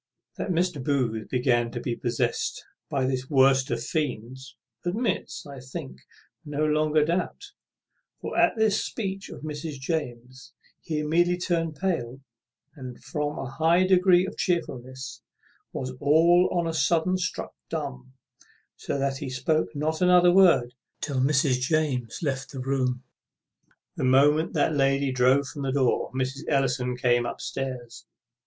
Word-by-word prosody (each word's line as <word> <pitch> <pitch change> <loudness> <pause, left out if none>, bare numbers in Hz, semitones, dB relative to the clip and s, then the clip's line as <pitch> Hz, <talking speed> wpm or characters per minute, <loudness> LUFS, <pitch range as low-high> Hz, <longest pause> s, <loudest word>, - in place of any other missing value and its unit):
That - - -4
Mr. 175 -5 0
Booth 120 -6 -1
began 120 -2 +1
to 120 - -5
be 120 0 -3
possessed 120 -1 -2 0.2
by 135 -2 0
this 130 0 -2
worst 135 -1 +4
of 120 -1 -2
fiends, 130 -2 -4 0.3
admits, 215 +8 -2
I 140 -2 -9
think, 95 - -8 0.4
no 150 +1 -1
longer 155 0 +2
doubt; 175 +3 -2 0.8
for - - -5
at - - +4
this 220 -2 +2
speech 195 -3 -4
of - - -9
Mrs. 150 0 -5
James 130 -4 -5 0.3
he 155 -3 -3
immediately 170 +4 +2
turned 165 -3 -1
pale, 140 -8 -2 0.5
and, 130 -5 -9
from 145 +2 -3
a - - -4
high 165 +7 +2
degree 185 -1 +5
of 190 - -7
chearfulness, 130 -7 -3 0.5
was 130 -1 -4
all 165 +5 +5
on 175 -1 0
a 165 - -2
sudden 165 +4 +2
struck 180 - -3 0.2
dumb, 65 0 -5 0.6
so - - -3
that 135 0 -1
he 135 - -5
spoke 150 +5 -1
not 155 +3 -1
another 180 -1 +6
word 170 -10 +5 0.3
till 140 -3 -2
Mrs. 135 -1 +2
James 135 -3 -1
left 135 -3 -2
the 135 - -7
room. 130 -1 -1 0.9
The - - -2
moment 145 +5 +4
that 155 0 +2
lady 135 -1 +2
drove 130 +2 +3
from 145 0 -7
the 135 -1 -1
door 130 -2 +1
Mrs. 130 +1 -2
Ellison 125 -3 0
came 120 -1 +2
up - - -6
stairs. 125 -3 -6
140 Hz, 145 wpm, -26 LUFS, 130-160 Hz, 0.9 s, another